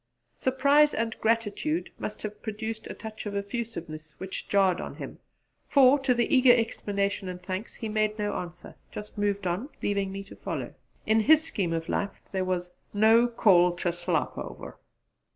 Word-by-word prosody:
Surprise 280 +3 +4
and 225 0 -1
gratitude 230 - 0
must - - -5
have 210 -1 -6
produced 220 0 -5
a - - -6
touch 220 -1 -7
of 200 - -4
effusiveness 200 -8 -5
which 190 0 -6
jarred 195 -3 +3
on - - -6
him; - - -8 0.5
for, 275 0 +6
to 265 -2 +2
the 240 +3 +2
eager 255 -1 +7
exclamation 200 -4 -1
and 180 0 -7
thanks, 190 +4 -4
he 225 - -5
made 215 0 0
no 205 -1 -1
answer 175 0 -7 0.2
just 210 0 -8
moved 205 -1 -1
on, 185 - -2
leaving 200 -1 0
me 195 0 -5
to 195 - -13
follow. - - -5 0.3
In 220 +1 +4
his 310 +8 +5
scheme 195 - -2
of 165 0 -2
life 200 -1 -2
there 190 -1 0
was 180 -1 -2 0.2
'no 225 +3 +6
call 180 -7 +4
to 175 0 -1
slop 175 -4 -1
over.' - - -8
205 Hz, 170 wpm, -28 LUFS, 185-230 Hz, 0.5 s, eager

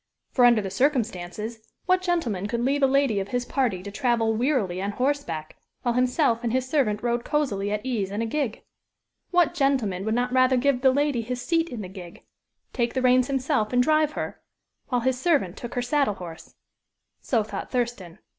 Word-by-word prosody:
For, 250 - +4
under 235 -3 +5
the 195 - -4
circumstances, 220 -4 -1 0.3
what 370 0 +3
gentleman 265 - -1
could 235 +3 -2
leave 280 +2 +1
a 270 - +6
lady 270 -6 +2
of 195 - -3
his 245 +1 -2
party 235 -11 -1
to 200 - -7
travel 235 -2 +1
wearily 220 -7 0
on 200 +1 -2
horseback, 250 - -2 0.3
while 240 -2 +1
himself 250 -1 +2
and 235 - 0
his 255 +1 0
servant 245 -7 0
rode 240 0 0
cosily 205 -10 -1
at 210 +3 -3
ease 225 -7 -1
in 205 +2 -4
a 230 - 0
gig? 250 -1 -2 0.7
What 350 -2 +3
gentleman 260 - +1
would 220 +1 0
not 245 +1 0
rather 255 0 +4
give 260 0 +2
the 265 - +6
lady 285 -2 +1
his 245 +2 -4
seat 335 0 +1
in 230 -4 -6
the - - -6
gig 180 -2 -11 0.5
take 235 0 -1
the 260 - +1
reins 255 0 +4
himself 265 -4 0
and 250 0 +4
drive 310 +1 +2
her, - - -5 0.5
while 250 -2 0
his 255 +1 0
servant 275 - +1
took 240 - -7
her 245 - 0
saddle 275 -4 +1
horse. 170 -3 -10 0.6
So 230 -4 0
thought 215 - -6
Thurston. 235 -9 -3
245 Hz, 195 wpm, -25 LUFS, 210-275 Hz, 0.7 s, a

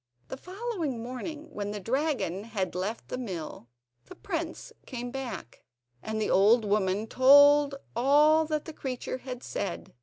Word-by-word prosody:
The - - -4
following 365 - -4
morning, 295 +6 -6
when 205 -1 -4
the 205 0 -4
dragon 240 - -1
had 200 -5 -3
left 195 +6 -4
the 255 - -4
mill, 175 - -6 0.4
the - - -12
prince 335 -4 -5
came 245 -2 -5
back, 240 - -7 0.4
and 220 0 -3
the 215 - 0
old 215 +4 +5
woman 205 0 +1
told 285 +3 +6
him - - -11 0.2
all 300 +6 +5
that 305 -1 -2
the 320 - -8
creature 255 -2 -4
had 255 -1 -7
said. 85 0 -5
255 Hz, 155 wpm, -28 LUFS, 210-295 Hz, 0.4 s, told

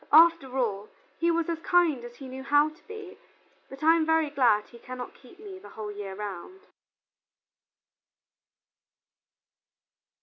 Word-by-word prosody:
After 320 -4 +6
all, 210 -4 -1 0.3
he 335 - +2
was 335 -1 +1
as 335 -1 -2
kind 330 -7 +2
as 240 0 -9
he 270 - -10
knew 260 +1 -7
how 290 +2 +4
to 310 - -21
be, 430 -2 -9 0.5
but 270 +2 -10
I 325 +1 +6
am 330 - +2
very 320 -1 +2
glad 240 -7 +3
he 235 - -14
cannot 250 +1 -7
keep 250 - -18
me 400 -3 -9
the - - -13
whole 215 -1 -6
year 200 -2 -7
round." 210 - -7
285 Hz, 145 wpm, -28 LUFS, 240-335 Hz, 0.5 s, After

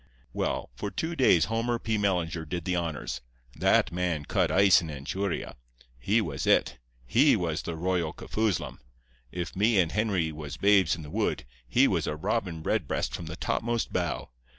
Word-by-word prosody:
"Well, - - -2
for 100 +11 -4
two 160 +10 -3
days 110 - +4
Homer 115 +1 -1
P. 110 -1 -2
Mellinger 90 -5 0
did 85 0 -3
the 90 - 0
honors. 80 -7 -3 0.3
That - - +3
man 85 -4 -1
cut - - +1
ice 95 0 +6
in 85 - -6
Anchuria. 80 +7 -3 0.4
He 105 - +2
was 75 -9 -4
It. 65 +1 +3 0.3
He 135 - +5
was 85 -6 -1
the 85 - -5
Royal 85 -1 0
Kafoozlum. 110 +1 -2 0.5
If 90 -1 -5
me 105 +3 +3
and 85 -3 +2
Henry 100 -7 0
was 75 -2 -7
babes 100 -5 +4
in 80 - -9
the 75 - -10
wood, - - -1 0.2
he - - +4
was - - 0
a 75 - -1
Robin 90 -2 -2
Redbreast - - -1
from 85 - -5
the 80 - -6
topmost 120 0 -1
bough. - - -2
90 Hz, 175 wpm, -28 LUFS, 80-105 Hz, 0.5 s, ice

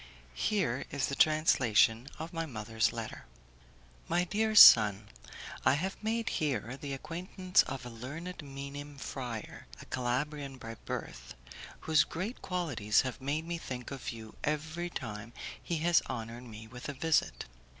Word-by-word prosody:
Here 140 - 0
is 140 -2 0
the 140 - -2
translation 125 -7 +4
of 160 +3 -6
my 165 -1 -2
mother's 110 -3 0
letter: - - -6 0.8
"My 175 - +2
dear 215 +4 0
son, 105 - +9 0.5
I 130 - +5
have 190 +6 -2
made 225 +1 -1
here 135 -4 -1
the 140 0 -5
acquaintance 180 +5 +1
of 135 -1 -5
a - - -6
learned 150 +11 -7
Minim 140 +1 -8
friar, 120 -5 -6
a - - -10
Calabrian 135 +2 -2
by 115 -2 -7
birth, - - -6 0.5
whose 160 -1 +4
great 190 +9 -5
qualities 145 - +1
have 130 0 -5
made 145 +4 -1
me 170 0 -3
think 125 -4 -6
of 135 -3 -5
you 110 -1 -8
every 160 +3 -2
time 115 -5 -6 0.3
he 170 - -2
has 175 -1 +5
honoured 115 +1 -5
me 110 -1 -9
with 125 +4 -8
a - - -3
visit. 160 +3 +1
140 Hz, 150 wpm, -32 LUFS, 120-165 Hz, 0.8 s, son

